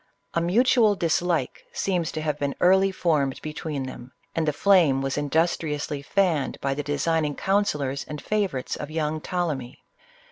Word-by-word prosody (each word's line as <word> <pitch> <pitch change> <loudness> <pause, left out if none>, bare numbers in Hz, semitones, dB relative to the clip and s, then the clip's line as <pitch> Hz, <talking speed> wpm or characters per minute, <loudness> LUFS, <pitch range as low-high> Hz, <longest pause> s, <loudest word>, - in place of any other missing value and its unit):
A 170 - +1
mutual 220 +4 +4
dislike 165 -4 0
seems 180 -4 -1
to 155 - -3
have 150 -1 -2
been, 140 -1 -1
early 190 +2 +4
formed 150 -8 0
between 155 -2 -4
them; 130 -1 -9 0.2
and 160 -1 -1
the - - +4
flame 165 -4 +4
was 135 -1 -1
industri 155 +1 0
ously 145 -1 -4
fanned 170 -3 0
by 135 0 -1
the 145 - -3
designing 150 +1 0
counsellors 150 -9 0
and 150 0 -6
favor 205 -7 -1
ites 130 - -4
of 150 - -6
young 155 0 -2
Ptolemy. 150 -9 -3
155 Hz, 165 wpm, -25 LUFS, 145-180 Hz, 0.2 s, mutual